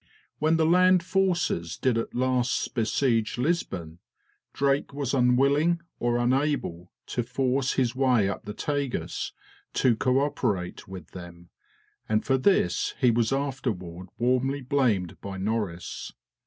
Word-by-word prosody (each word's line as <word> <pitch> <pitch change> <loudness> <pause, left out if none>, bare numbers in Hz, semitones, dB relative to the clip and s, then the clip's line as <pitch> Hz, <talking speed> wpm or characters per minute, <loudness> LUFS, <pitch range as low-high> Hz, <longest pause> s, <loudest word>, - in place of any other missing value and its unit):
When 155 +2 +3
the 160 - +3
land 180 +1 +5
forces 175 - 0
did 130 -3 +1
at 115 - -3
last 125 0 0
besiege 115 0 +1
Lisbon, 95 - -2 0.5
Drake 140 0 0
was 140 -2 -2
unwilling 140 +6 +3 0.2
or 120 0 +1
unable 120 - 0
to 120 - -2
force 130 +2 0
his 125 -3 0
way 125 -6 +3
up 100 - -4
the 105 - -5
Tagus 145 -4 -2 0.4
to 125 -3 +3
co 130 +4 +2
operate 95 -10 -2
with 95 -4 -10
them, 85 -1 -11 0.6
and 110 0 +1
for 135 -1 +2
this 130 - +2
he 125 - +4
was 115 0 +1
afterward 120 -11 -3
warmly 130 +3 +1
blamed 120 - 0
by 100 -1 -6
Norris. 100 -3 -3
125 Hz, 130 wpm, -26 LUFS, 105-140 Hz, 0.6 s, land